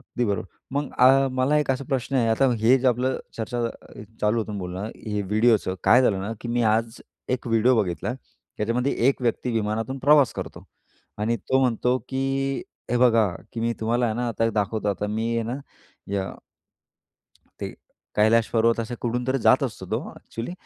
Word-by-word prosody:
अगदी 125 -2 -3
बरोबर. 100 -2 -1 0.3
मग 145 0 -1
अ, 135 +2 +6
मला 130 +4 +2
एक 145 -3 0
असा 135 +1 -1
प्रश्न 135 0 -2
आहे. 115 -3 +2
आता 130 +4 +3
हे 120 +4 +5
जे 130 - -1
आपलं 125 +2 0 0.2
चर्चा 120 +2 -3 0.6
चालू 105 +2 +2
होतं 105 -2 -3
बोलणं, 95 +4 -5 0.2
हे 105 -1 -1
व्हिडिओचं 105 -1 +2
काय 125 +2 +6
झालं 100 -6 +2
ना, 105 +4 -3
की 120 - -6
मी 120 0 +1
आज 115 +1 -1 0.4
एक 125 - -16
व्हिडिओ 115 +2 +3
बघितला. 90 +6 -3 0.4
त्याच्यामध्ये 120 +5 0 0.2
एक 135 - 0
व्यक्ती 120 +1 0
विमानातून 115 +4 -2
प्रवास 145 -1 +5
करतो - - -7 0.5
आणि 115 +3 0
तो 130 +6 0
म्हणतो 125 0 +2
की 130 - -3 0.7
हे 120 - +2
बघा, 115 -3 +5 0.3
की 115 - -4
मी 115 0 +1
तुम्हाला 120 +2 +1
आहे 110 - -1
ना, 120 0 -1
आता 115 0 -1
एक 115 - +1
दाखवतो. 105 0 -1
आता 100 +1 -1
मी 110 +2 -1
आहे 115 - 0
ना - - -2 0.6
या 95 -1 -2 1.3
ते - - -3 0.5
कैलाश 110 +1 +4
पर्वत 115 0 +2
असे 115 +2 -4
कुठून 125 +1 -2
तरी 135 +1 +1
जात - - +4
असतो, - - -4
तो - - 0 0.2
एक्चुअली 115 +9 -6
115 Hz, 185 wpm, -24 LUFS, 110-125 Hz, 1.3 s, अ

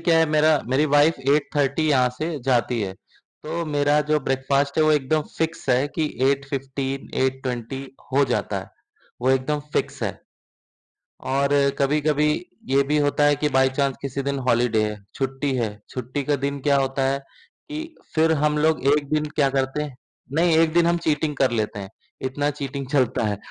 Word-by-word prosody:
क्या 165 -1 +3
है 160 - +4
मेरा 155 0 +4
मेरी 135 +4 +2
वाइफ़ 145 0 +4
8:30 145 +1 0
यहाँ 130 -3 +4
से 160 -1 -2
जाती 125 -2 +1
है, 95 -3 -2
तो 160 - -8
मेरा 145 0 +2
जो 155 - +4
ब्रेकफ़ास्ट 135 +2 0
है 155 - +5
वो 155 - +4
एकदम 150 +1 +1 0.2
फ़िक्स 160 -3 -2
है 130 +3 +3
कि 160 - +1 0.2
8:15-8:20 135 -2 -3 0.3
हो 140 +1 +4
जाता 125 -2 -1
है। - - -12 0.5
वो 130 - +3
एकदम 135 +3 +1
फ़िक्स - - -2
है, - - -1 1.1
और 140 +1 0 0.3
कभी-कभी 150 +1 +2 0.4
ये 135 +1 +4
भी 150 - +3
होता 145 0 +2
है 145 0 +4
कि 150 +1 0
बाय 130 0 +5
चांस 140 -2 +1
किसी 140 0 -3
दिन 140 0 -2
हॉलिडे 115 -2 +3
है, 105 0 -3 0.2
छुट्टी 135 +1 -2
है, 110 -4 -2
छुट्टी 130 +3 -4
के 145 0 +1
दिन 140 +1 -3
क्या 140 +1 +3
होता 135 0 0
है 140 - -1 0.5
कि 315 +2 -6 0.2
फिर 160 0 +4
हम 150 0 +2
लोग 155 +1 +2
1 145 -2 -1
दिन 155 0 +2
क्या 145 -3 +4
करते 135 +2 -1
हैं 145 -3 -6 0.4
नहीं, 165 +2 +3
1 165 -1 +3
दिन 170 0 +4
हम 170 0 +3
चीटिंग 150 -1 0
कर 135 -1 +2
लेते 110 -3 -2
हैं, 100 -1 -7 0.3
इतना 145 +3 -1
चीटिंग 140 -1 -5
चलता 130 -5 +1
है। 105 -1 -1
140 Hz, 180 wpm, -23 LUFS, 130-150 Hz, 1.1 s, है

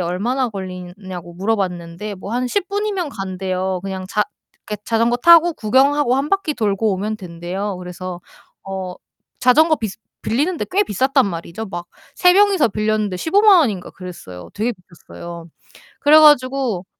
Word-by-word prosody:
얼마나 225 +10 -1
걸리나 185 -4 -7 0.2
냐고 175 -2 -8
물어봤는데 190 -1 -3
뭐 200 +4 -7
한 250 +1 -1
10 390 +8 -1
분이면 400 -6 -2
간대요. 190 -2 -3
그냥 190 -1 -5
자 210 - +1 0.4
그 210 - -4
자전거 230 +1 +1
타고 340 +4 +7
구경하고 265 +2 +2
1 275 +2 -1
바퀴 390 -6 0
돌고 215 -2 0
오면 210 +3 -3
된대요. 185 +2 -5
그래서 180 0 -7 0.5
어 190 -2 -5 0.4
자전거 310 +6 +4
비스 215 -6 -5 0.2
빌리는데 305 +10 0
꽤 390 +3 +3
비쌌단 265 - +2
말이죠. 170 +4 -6
막 175 -3 -6 0.3
3 360 -1 +5
명이서 390 - +4
빌렸는데 215 -2 -1
150,000 395 - +5
원인가 210 - 0
그랬어요. 170 - -10
되게 225 +4 -1 0.2
비쌌어요. 170 0 -11 0.5
그래 305 +2 +7
가지고 255 - +3
215 Hz, 315 characters per minute, -19 LUFS, 185-275 Hz, 0.5 s, 타고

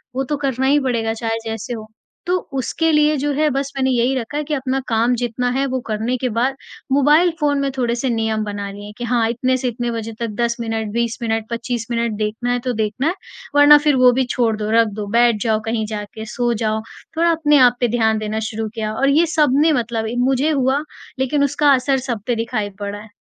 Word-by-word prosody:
वो 270 - 0
तो 290 +2 -2
करना 265 0 0
ही 290 +2 +4
पड़ेगा 230 -5 -1
चाहे 225 0 -2
जैसे 225 +2 -4
हो। 220 -1 -7 0.4
तो 365 +1 +2 0.2
उसके 320 +5 0
लिए 300 0 +3
जो 290 +2 -1
है 300 +2 +2
बस 275 +1 -2
मैंने 265 -1 +1
यही 245 +1 +2
रखा 260 +3 -4
है 300 - -1
कि 300 +1 -4
अपना 270 -1 -1
काम 230 +1 +2
जितना 245 +1 -1
है 270 +2 0
वो 260 0 -2
करने 220 +3 -1
के 255 0 -2
बाद 260 +3 +1 0.4
मोबाइल 295 +6 +4
फ़ोन 290 -2 +1
में 275 - 0
थोड़े-से 240 +1 0
नियम 220 -1 0
बना 205 -1 -4
लिए 205 +1 -9
कि 245 - -6
हाँ, 235 -1 +1
इतने 255 +2 0
से 255 - -2
इतने 240 0 -2
बजे 225 -1 -5
तक 235 -1 -2
10 235 0 +1
मिनट 225 -2 -3
20 235 0 -1
मिनट 225 -1 -1
25 235 0 -3
मिनट 235 -1 0
देखना 220 +3 -2
है 245 - +1
तो 250 - +1
देखना 220 +5 -1
है 335 - +1 0.4
वरना 290 +1 +8
फ़िर 295 -1 +2
वो 255 -1 +6
भी 260 +2 +1
छोड़ 230 -3 +1
दो 210 0 -3
रख 230 0 +4
दो 205 - -4
बैठ 235 -3 +3
जाओ 220 -2 +1
कहीं 225 -1 -1
जाके 215 +1 -6
सो 240 -1 +1
जाओ। 220 -1 -1 0.4
थोड़ा 340 +1 +3
अपने 300 -3 +3
आप 245 - 0
पे 245 - +2
ध्यान 220 -1 +2
देना 215 0 -3
शुरू 220 0 -4
किया 215 -1 -3
और 275 +5 +1
ये 315 +5 +4
सब 300 -5 +3
ने 320 0 +4
मतलब 230 -3 -1 0.2
मुझे 270 +3 +2
हुआ 270 -1 +1 0.4
लेकिन 280 +2 +1
उसका 285 +1 +3
असर 265 +1 +2
सब 225 -4 -2
पर 240 - +1
दिखाई 225 -2 -2
पड़ा 205 0 -4
है। 215 0 -13
240 Hz, 230 wpm, -19 LUFS, 225-270 Hz, 0.4 s, वरना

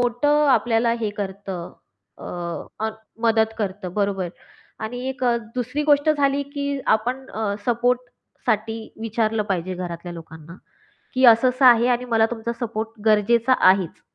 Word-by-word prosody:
मोठं 290 +5 +2
आपल्याला 230 -2 +3
हे 215 -2 -1
करतं. 190 -3 -5 1.1
अ, 220 - 0 0.3
मदत 225 -1 +2
करतं. 190 -3 -4
बरोबर 200 -3 0 0.6
आणि 245 +3 -5
एक 260 -1 -4
अ, 240 -1 +3 0.2
दुसरी 255 +4 -2
गोष्ट 290 0 +4
झाली, 285 -2 +1
की 280 0 -4
आपण 250 +5 0
अ, 215 -2 -2
सपोर्टसाठी 240 -2 -1 0.2
विचारलं 225 -1 0
पाहिजे 185 0 -1
घरातल्या 175 -1 -6
लोकांना, 165 0 -11 0.6
की 260 0 +2
असं-असं 250 +3 +5
आहे 240 -1 +7
आणि 245 0 +1
मला 225 -2 +3
तुमचा 235 0 -3
सपोर्ट 225 -1 -4
गरजेचा 230 +4 +4 0.2
आहेच, 190 -3 -1
225 Hz, 130 wpm, -22 LUFS, 205-250 Hz, 1.1 s, आहे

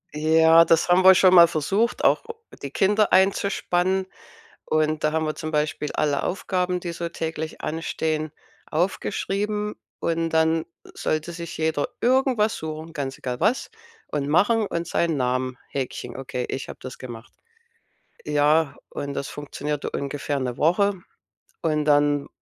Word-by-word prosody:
Ja, 160 +2 +6
das 165 +1 +2
haben 180 +1 +5
wir 190 0 +9
schon 185 0 +5
mal 170 -2 +9
versucht, 195 +9 0
auch - - +3 0.4
die 140 - -5
Kinder 205 +7 +2
einzuspannen. 190 -1 +2 0.6
Und 155 0 0
da 155 - +1
haben 160 0 0
wir 155 - -2
zum 155 - -5
Beispiel 150 -1 -1
alle 145 -2 0
Aufgaben, 180 -1 -1
die 175 - -4
so 170 0 -4
täglich 160 -1 -5
anstehen, 155 -1 -2 0.4
aufgeschrieben. 205 +4 -1 0.2
Und 165 0 -1
dann 160 0 +2 0.3
sollte 155 +2 -2
sich 170 0 -7
jeder 160 -2 0
irgendwas 245 -3 +2
suchen, 160 +1 -6
ganz 140 -4 -4
egal 125 -1 -4
was 215 +9 +1 0.4
und 145 -2 -2
machen 205 +9 +3
und 170 -2 -3
seinen 170 -1 0
Namen 130 -1 -1
Häkchen: 135 -2 -5
„Okay, 125 -2 -4
ich 135 - -4
habe - - -9
das 130 -1 -8
gemacht.“ 120 -2 -10 0.9
Ja, 150 0 +2
und 140 0 -5
das 140 - -3
funktionierte 145 0 -4
ungefähr 140 0 -3
'ne 125 -2 -3
Woche. 200 +6 +3 0.7
Und 150 -2 +1
dann 145 -1 +3
160 Hz, 145 wpm, -24 LUFS, 145-180 Hz, 0.9 s, wir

